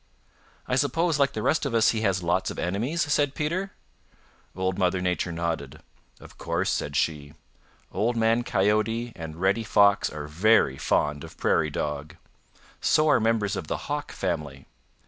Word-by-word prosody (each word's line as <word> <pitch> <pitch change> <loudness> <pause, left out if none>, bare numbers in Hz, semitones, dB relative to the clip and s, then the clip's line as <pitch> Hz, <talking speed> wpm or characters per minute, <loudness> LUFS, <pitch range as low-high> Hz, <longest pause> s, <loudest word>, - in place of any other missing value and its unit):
"I 125 - 0
suppose, 160 +3 +1
like 140 0 +2
the 110 - -4
rest 160 - +1
of 135 -5 -2
us, 115 0 +4
he 110 - -2
has 95 -4 0
lots 85 +1 0
of - - -7
enemies?" 115 - -1
said 145 -2 +1
Peter. 175 +6 -2 0.9
Old 95 0 -2
Mother 90 0 +1
Nature 90 -1 -1
nodded. 80 -5 -3 0.4
"Of - - -15
course," - - -1
said 70 - -2
she. 70 0 -1 0.6
"Old 115 +5 0
Man 115 +1 +3
Coyote 110 +3 0
and 80 -2 -7
Reddy 95 +5 +1
Fox 100 -1 +4
are 75 -1 -6
very 80 -4 +3
fond 75 -1 0
of - - -11
Prairie 75 - +1
Dog. 75 0 -4 0.7
So 155 0 +3
are - - +5
members 110 -2 +1
of 80 - -5
the - - -2
Hawk 145 0 -3
family. 75 -5 -4
100 Hz, 165 wpm, -26 LUFS, 80-120 Hz, 0.9 s, are